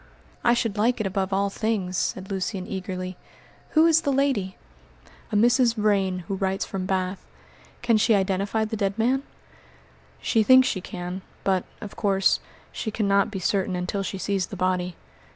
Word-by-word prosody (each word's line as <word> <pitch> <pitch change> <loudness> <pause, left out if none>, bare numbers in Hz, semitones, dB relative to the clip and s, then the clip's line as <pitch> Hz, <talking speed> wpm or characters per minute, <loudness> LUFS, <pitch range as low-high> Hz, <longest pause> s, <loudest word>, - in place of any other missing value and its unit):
"I 240 - +4
should 225 -4 -1
like 240 +3 +2
it 215 - -1
above 190 0 -1
all 200 +1 +1
things," 200 -4 -1
said 190 +2 -2
Lucian 190 0 -2
eagerly. 185 -2 -5 0.6
"Who 315 - +7
is 325 -1 +5
the 285 - 0
lady?" 260 -9 0 0.7
"A - - -1
Mrs. 240 +2 +4
Vrain, 195 -4 +1
who - - -2
writes 190 0 -1
from 185 -1 -4
Bath." 185 0 -1 0.6
"Can 235 -2 +4
she 215 +1 +4
identify 200 +3 0
the 220 - -4
dead 200 -1 -1
man?" 250 +4 +2 1.0
"She 225 - +2
thinks 260 +3 +6
she 185 - -1
can, 180 +1 -6 0.2
but, 190 -2 +1 0.2
of 210 -3 -8
course, 195 -1 +2 0.3
she 220 - -4
cannot 200 -2 +2
be 205 - -5
certain 190 0 0
until 180 +3 -2
she 195 0 -4
sees 195 -1 -1
the - - -7
body. 180 -1 -1
195 Hz, 170 wpm, -25 LUFS, 185-220 Hz, 1.0 s, Who